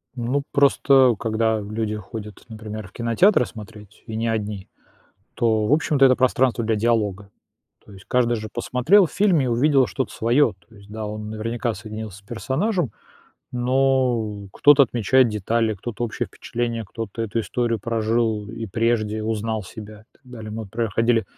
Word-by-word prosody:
Ну, 130 +3 -1
просто 135 -3 +4
когда 110 -1 0
люди 105 +1 -3
ходят, 105 0 -8
например, 110 -2 -7
в - - -19
кинотеатры 120 - +3
смотреть, 105 -2 -12
и 110 - -5
не 115 +1 -1
одни, 105 -3 -3 0.7
то, 110 -2 +1
в 130 - 0
общем-то, 150 -2 +3
это 130 -1 +6
пространство 130 -1 +2
для 110 0 +1
диалога. 105 -3 0 0.5
То - - -16
есть 95 0 -14
каждый 120 -1 +2
же 110 0 -6
посмотрел 125 - +3
в - - -14
фильме 190 -8 +3
и - - -1
увидел 135 +2 +3
что-то 130 +1 -3
своё, 120 +1 +2
то 115 - -20
есть, 100 0 -16
да, 110 0 -5
он 105 0 -6
наверняка 115 +2 -2
соединился 110 -3 -8
с 100 - -19
персонажем, 135 - -1 0.6
но 125 -5 0
кто-то 145 +4 +6
отмечает 125 +1 +3
детали, 110 +1 0
кто-то 120 +4 -5
общее 115 - -3
впечатление, 115 -1 -4
кто-то 115 +2 -6
эту 115 +1 -2
историю 115 0 -1
прожил 110 -1 0
и 115 0 -6
прежде, 110 0 0
узнал 110 0 -2
себя 105 +2 -11
и - - -28
так - - -31
далее. 115 -4 -9
Мы 110 0 -5
проходили 115 +1 0
115 Hz, 165 wpm, -22 LUFS, 110-125 Hz, 0.7 s, это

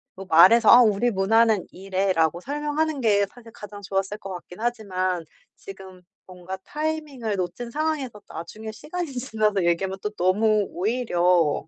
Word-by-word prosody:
뭐 195 - -9
말해서 190 +7 +6
"아 245 - +9
우리 225 +1 +2
문화는 220 +1 +2
이래."라고 185 -3 0
설명하는 295 +3 -2
게 205 -3 +3
사실 230 +2 -16
가장 205 -1 -11
좋았을 195 +1 -2
것 195 -2 -8
같긴 180 +1 -10
하지만 185 -7 -2 0.3
지금 190 -2 -12 0.2
뭔가 185 +1 -8
타이밍을 300 -8 -3
놓친 185 +6 -4
상황에서 290 -5 -3
나중에 215 +7 -8
시간이 330 +8 -6
지나서 215 -6 0
얘기하면 190 +3 0
또 210 - -2
너무 210 +3 +2
오히려 180 -7 +1
205 Hz, 335 characters per minute, -24 LUFS, 185-240 Hz, 0.3 s, 아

